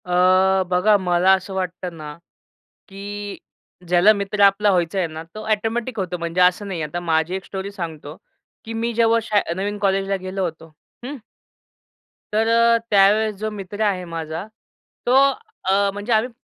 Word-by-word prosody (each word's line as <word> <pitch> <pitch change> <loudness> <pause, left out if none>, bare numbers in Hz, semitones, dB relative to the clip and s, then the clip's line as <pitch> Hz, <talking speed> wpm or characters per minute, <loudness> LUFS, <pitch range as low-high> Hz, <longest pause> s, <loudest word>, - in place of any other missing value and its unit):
अ, 185 +1 +3
बघा 185 +4 +4
मला 180 0 +2
असं 190 +1 -2
वाटतं 180 -2 -4
ना, 150 -1 -8 0.8
की 205 +1 -7 0.5
ज्याला 180 +4 +6
मित्र 200 0 -3
आपला 200 +1 +5
व्हायच 175 -1 0
आहे 185 -2 +1
ना, 160 0 -8
तो 215 - -7
ऑटोमॅटिक 225 +3 -1
होतो 180 -2 -2
म्हणजे 170 +1 -2
असं 180 +3 +3
नाही 180 -4 -4
आहे. 155 - -3
आता 175 - -3
माझी 165 0 0
एक 190 0 -4
स्टोरी 195 0 -6
सांगतो, 160 -5 -7 0.5
की 225 - -6
मी 230 +1 -2
जेव्हा 230 0 +3
शा 210 -2 +2 0.2
नवीन 205 +2 -3
कॉलेजला 195 0 0
गेलो 190 +1 -3
होतो, 165 -1 -7 0.3
हं. 285 +4 -5 1.2
तर 220 +1 +2
अ, 230 0 +4
त्यावेळेस 210 +2 +4
जो 215 +2 -3
मित्र 205 0 -7
आहे 195 -4 0
माझा 165 +1 -5 0.6
तो 245 - +3 0.5
अ, 200 +1 +2
म्हणजे 205 +4 -2
आम्ही 220 +3 +2
195 Hz, 165 wpm, -21 LUFS, 180-210 Hz, 1.2 s, ज्याला